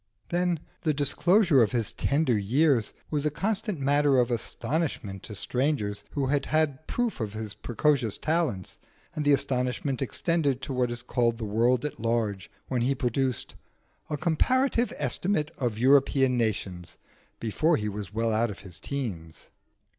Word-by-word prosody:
Then, 175 Hz, -2 st, 0 dB, 0.2 s
the 155 Hz, -3 st, +1 dB
disclosure 165 Hz, -, +4 dB
of 115 Hz, -, +2 dB
his 115 Hz, -4 st, 0 dB
tender 140 Hz, -4 st, +1 dB
years 120 Hz, +3 st, +2 dB, 0.2 s
was 150 Hz, -2 st, 0 dB
a 150 Hz, -, +2 dB
constant 200 Hz, +3 st, -1 dB
matter 140 Hz, 0 st, +3 dB
of 125 Hz, -1 st, +2 dB
astonishment 120 Hz, -, -2 dB
to 105 Hz, -, -8 dB
strangers 125 Hz, -4 st, -1 dB
who 140 Hz, -2 st, 0 dB
had 140 Hz, +1 st, 0 dB
had 155 Hz, -2 st, 0 dB
proof 240 Hz, -7 st, -1 dB
of 105 Hz, -3 st, -3 dB
his 110 Hz, -1 st, -5 dB
precocious 120 Hz, -3 st, 0 dB
talents, 155 Hz, -, -1 dB, 0.3 s
and 155 Hz, -, -2 dB
the 145 Hz, -, +4 dB
astonishment 130 Hz, 0 st, -1 dB
extended 145 Hz, 0 st, 0 dB
to 135 Hz, -, -4 dB
what 125 Hz, -1 st, +1 dB
is 120 Hz, 0 st, -4 dB
called 120 Hz, -2 st, +1 dB
the 115 Hz, -, -4 dB
world 120 Hz, +5 st, +2 dB
at 150 Hz, -, -5 dB
large 110 Hz, -4 st, -1 dB, 0.2 s
when 125 Hz, -2 st, -1 dB
he 135 Hz, +3 st, +1 dB
produced 130 Hz, +1 st, -1 dB, 0.6 s
'A 150 Hz, -, -1 dB
Comparative 245 Hz, -, +2 dB
Estimate 150 Hz, +3 st, 0 dB
of 120 Hz, -5 st, -1 dB
European 135 Hz, +1 st, +4 dB
Nations' 95 Hz, -8 st, -2 dB, 0.4 s
before 155 Hz, +9 st, +1 dB
he 105 Hz, -, -2 dB
was 105 Hz, -1 st, -5 dB
well 115 Hz, +1 st, 0 dB
out 115 Hz, +2 st, +2 dB
of 100 Hz, -, -8 dB
his 90 Hz, -4 st, -8 dB
teens. 90 Hz, -, -5 dB
130 Hz, 155 wpm, -27 LUFS, 115-150 Hz, 0.6 s, disclosure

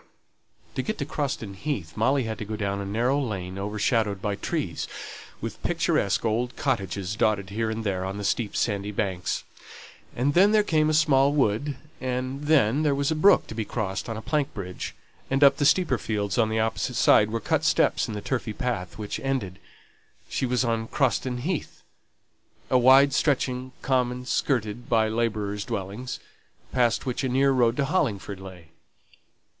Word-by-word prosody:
To -, -, -1 dB
get 215 Hz, -, -3 dB
to 140 Hz, -, -3 dB
Croston 135 Hz, -8 st, -3 dB
Heath, 95 Hz, -, -4 dB
Molly 130 Hz, +5 st, +2 dB
had 110 Hz, -2 st, -4 dB
to -, -, -3 dB
go 110 Hz, +1 st, -4 dB
down 100 Hz, -1 st, -2 dB
a 100 Hz, -, -5 dB
narrow 120 Hz, +7 st, +1 dB
lane 95 Hz, -6 st, -4 dB
overshadowed 105 Hz, 0 st, 0 dB
by 105 Hz, 0 st, -2 dB
trees, -, -, -3 dB, 0.5 s
with -, -, -6 dB
picturesque 100 Hz, -, +1 dB
old 120 Hz, +3 st, 0 dB
cottages 100 Hz, -6 st, -2 dB
dotted 100 Hz, -3 st, +1 dB
here 110 Hz, +2 st, -1 dB
and 110 Hz, 0 st, -3 dB
there 95 Hz, -3 st, -1 dB
on 95 Hz, +1 st, -4 dB
the 105 Hz, -, -5 dB
steep 105 Hz, +1 st, -1 dB
sandy 100 Hz, -2 st, 0 dB
banks; 95 Hz, -3 st, -2 dB, 0.7 s
and 135 Hz, +4 st, +1 dB
then 195 Hz, +6 st, +5 dB
there 215 Hz, -1 st, +5 dB
came 155 Hz, -5 st, +2 dB
a 155 Hz, -, +2 dB
small 140 Hz, -3 st, +4 dB
wood, 135 Hz, +1 st, +1 dB, 0.2 s
and 130 Hz, +2 st, -3 dB
then 145 Hz, -3 st, +3 dB
there 150 Hz, -3 st, +2 dB
was 140 Hz, +2 st, 0 dB
a -, -, +1 dB
brook 195 Hz, +6 st, +5 dB
to -, -, -8 dB
be 110 Hz, 0 st, -2 dB
crossed 105 Hz, -2 st, -3 dB
on 115 Hz, -, -3 dB
a 110 Hz, -, -7 dB
plank 150 Hz, -2 st, 0 dB
bridge, 90 Hz, -3 st, -6 dB, 0.3 s
and 135 Hz, +1 st, +2 dB
up 140 Hz, -, +7 dB
the 145 Hz, -, +3 dB
steeper 160 Hz, -10 st, +3 dB
fields 100 Hz, -3 st, -2 dB
on 110 Hz, -1 st, +3 dB
the 110 Hz, 0 st, 0 dB
opposite 110 Hz, 0 st, -1 dB
side 105 Hz, -, +5 dB
were 115 Hz, +1 st, -2 dB
cut 160 Hz, +4 st, 0 dB
steps 165 Hz, -, +2 dB
in 110 Hz, -, -5 dB
the 105 Hz, -, -4 dB
turfy 120 Hz, -3 st, -2 dB
path; 110 Hz, -8 st, -3 dB
these 105 Hz, -1 st, -4 dB
ended, 120 Hz, -9 st, -2 dB, 0.7 s
she 130 Hz, -, -1 dB
was 125 Hz, +1 st, +1 dB
on 115 Hz, -1 st, -1 dB
Croston 130 Hz, -2 st, 0 dB
Heath, 165 Hz, +2 st, -4 dB, 0.9 s
a 130 Hz, -, +6 dB
wide 135 Hz, +2 st, +6 dB
stretching 130 Hz, -3 st, 0 dB
common 125 Hz, -1 st, 0 dB
skirted 120 Hz, -3 st, -1 dB
by 110 Hz, -2 st, +3 dB
labourers' 105 Hz, -3 st, -1 dB
dwellings, 100 Hz, +8 st, -5 dB, 0.5 s
past 120 Hz, -2 st, +1 dB
which 130 Hz, +1 st, -2 dB
a 130 Hz, -, 0 dB
near 135 Hz, +2 st, +3 dB
road 120 Hz, -3 st, +2 dB
to 140 Hz, -, +2 dB
Hollingford 110 Hz, -, -1 dB
lay. 90 Hz, -4 st, -11 dB
115 Hz, 180 wpm, -26 LUFS, 105-135 Hz, 0.9 s, up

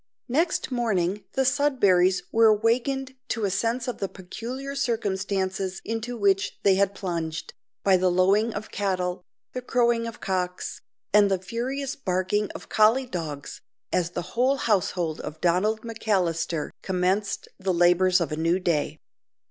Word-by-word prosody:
Next 310 Hz, +2 st, 0 dB
morning 210 Hz, -5 st, 0 dB
the 265 Hz, -, +2 dB
Sudberrys 205 Hz, -10 st, +3 dB
were 225 Hz, 0 st, +5 dB
awakened 245 Hz, +5 st, +1 dB
to 225 Hz, -3 st, -1 dB
a 195 Hz, -, 0 dB
sense 230 Hz, +6 st, -1 dB
of 250 Hz, -, -4 dB
the 195 Hz, -, -2 dB
peculiar 240 Hz, +9 st, -6 dB
circumstances 195 Hz, -6 st, -1 dB
into 225 Hz, +2 st, -3 dB
which 195 Hz, -2 st, +1 dB
they 195 Hz, -, +5 dB
had 200 Hz, +1 st, +2 dB
plunged, 165 Hz, -4 st, -4 dB, 0.3 s
by 190 Hz, -2 st, +5 dB
the 185 Hz, 0 st, +2 dB
lowing 195 Hz, +5 st, +3 dB
of 215 Hz, 0 st, -6 dB
cattle, 185 Hz, -3 st, -1 dB, 0.3 s
the 255 Hz, -, -3 dB
crowing 235 Hz, -2 st, +1 dB
of 230 Hz, +1 st, -8 dB
cocks, 180 Hz, -2 st, -3 dB, 0.3 s
and 205 Hz, -1 st, +6 dB
the 195 Hz, -, +2 dB
furious 255 Hz, +9 st, -3 dB
barking 190 Hz, -1 st, 0 dB
of -, -, -9 dB
collie 225 Hz, +5 st, +4 dB
dogs, 160 Hz, -, -6 dB, 0.3 s
as 175 Hz, -2 st, +1 dB
the 175 Hz, 0 st, -4 dB, 0.4 s
household 180 Hz, -6 st, 0 dB
of 155 Hz, +1 st, -7 dB
Donald 185 Hz, +6 st, +2 dB
McAllister 180 Hz, -8 st, -1 dB
commenced 190 Hz, +2 st, 0 dB
the 190 Hz, 0 st, 0 dB
labours 180 Hz, +1 st, +4 dB
of 170 Hz, -4 st, -2 dB
a -, -, -1 dB
new 165 Hz, +3 st, +1 dB
day. 170 Hz, -5 st, 0 dB
195 Hz, 145 wpm, -26 LUFS, 180-230 Hz, 0.4 s, and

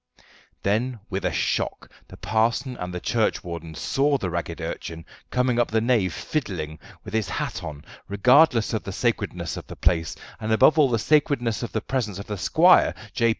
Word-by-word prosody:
Then 110 Hz, +6 st, +1 dB
when 120 Hz, -, -13 dB
with 95 Hz, +1 st, -2 dB
a -, -, +1 dB
shock -, -, -1 dB, 0.2 s
the -, -, -13 dB
parson 120 Hz, +4 st, 0 dB
and 90 Hz, 0 st, -5 dB
the 90 Hz, -, -4 dB
churchwardens 85 Hz, -7 st, -2 dB
saw 140 Hz, +1 st, +1 dB
the 95 Hz, -8 st, -3 dB
ragged 85 Hz, 0 st, -4 dB
urchin 80 Hz, 0 st, -6 dB, 0.2 s
coming 125 Hz, -1 st, +1 dB
up 120 Hz, -, +2 dB
the 110 Hz, -, +2 dB
nave 110 Hz, -6 st, +2 dB
fiddling, 85 Hz, -, -4 dB, 0.2 s
with -, -, -9 dB
his 110 Hz, -3 st, 0 dB
hat 90 Hz, 0 st, -3 dB
on, 75 Hz, -3 st, -7 dB, 0.2 s
regardless 120 Hz, +4 st, +4 dB
of 110 Hz, -, 0 dB
the 100 Hz, -, -6 dB
sacredness 100 Hz, -7 st, -2 dB
of -, -, -8 dB
the -, -, -8 dB
place, 80 Hz, -3 st, +1 dB, 0.2 s
and 110 Hz, 0 st, -3 dB
above 135 Hz, +9 st, +5 dB
all 150 Hz, -, +7 dB
of 125 Hz, -, -3 dB
the -, -, +3 dB
sacredness 125 Hz, -4 st, +1 dB
of 120 Hz, -, -4 dB
the 110 Hz, -, -1 dB
presence 115 Hz, -7 st, -2 dB
of 100 Hz, -, -7 dB
the 105 Hz, -3 st, -5 dB
squire, -, -, +5 dB, 0.2 s
J. 115 Hz, -, +2 dB
110 Hz, 195 wpm, -24 LUFS, 90-125 Hz, 0.2 s, all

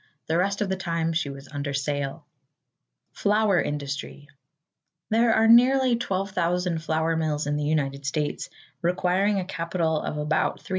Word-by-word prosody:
The 160 Hz, -, -1 dB
rest 200 Hz, +3 st, 0 dB
of 205 Hz, -, 0 dB
the 190 Hz, -, 0 dB
time 165 Hz, -3 st, -1 dB
she 160 Hz, -3 st, -1 dB
was 140 Hz, 0 st, -9 dB
under 145 Hz, -1 st, -4 dB
sail. 140 Hz, 0 st, -3 dB, 0.9 s
=Flour 205 Hz, -2 st, +2 dB
Industry.= 145 Hz, 0 st, -5 dB, 0.8 s
There 230 Hz, +1 st, +4 dB
are 220 Hz, 0 st, +4 dB
nearly 250 Hz, +2 st, +6 dB
12,000 180 Hz, -5 st, -1 dB
flour 160 Hz, +1 st, 0 dB
mills 155 Hz, -2 st, -1 dB
in 145 Hz, 0 st, -1 dB
the 150 Hz, -, -1 dB
United 140 Hz, -2 st, -1 dB
States, 150 Hz, 0 st, -2 dB, 0.3 s
requiring 185 Hz, +3 st, +1 dB
a 185 Hz, -, -3 dB
capital 165 Hz, -2 st, -1 dB
of 150 Hz, -, -4 dB
about 150 Hz, +1 st, 0 dB
$350,000,000. -, -, -14 dB
165 Hz, 150 wpm, -25 LUFS, 150-195 Hz, 0.9 s, nearly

